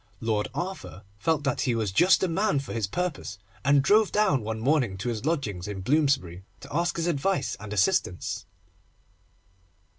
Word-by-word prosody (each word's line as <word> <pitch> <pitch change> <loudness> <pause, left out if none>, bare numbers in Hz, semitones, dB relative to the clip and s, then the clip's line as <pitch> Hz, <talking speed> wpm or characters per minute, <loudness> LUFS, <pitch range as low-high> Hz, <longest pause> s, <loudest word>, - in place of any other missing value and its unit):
Lord 110 -2 0
Arthur 180 - -5 0.2
felt 150 +6 +1
that 140 -3 0
he 125 -3 +1
was 110 -4 -1
just 180 - +4
the 190 - +2
man 195 +1 +1
for 140 - -4
his 110 -4 -1
purpose, 165 - -3 0.3
and 140 0 +4
drove 210 +6 +4
down 200 - +2
one 110 +1 -4
morning 125 -6 +1
to 100 +6 -3
his 115 +1 -4
lodgings 105 - -2
in 100 -2 -5
Bloomsbury, 130 - +1 0.2
to - - -9
ask 175 +1 +1
his 165 - -1
advice 170 -1 0
and 105 0 -9
assistance. 95 -3 0
135 Hz, 170 wpm, -27 LUFS, 105-170 Hz, 0.3 s, just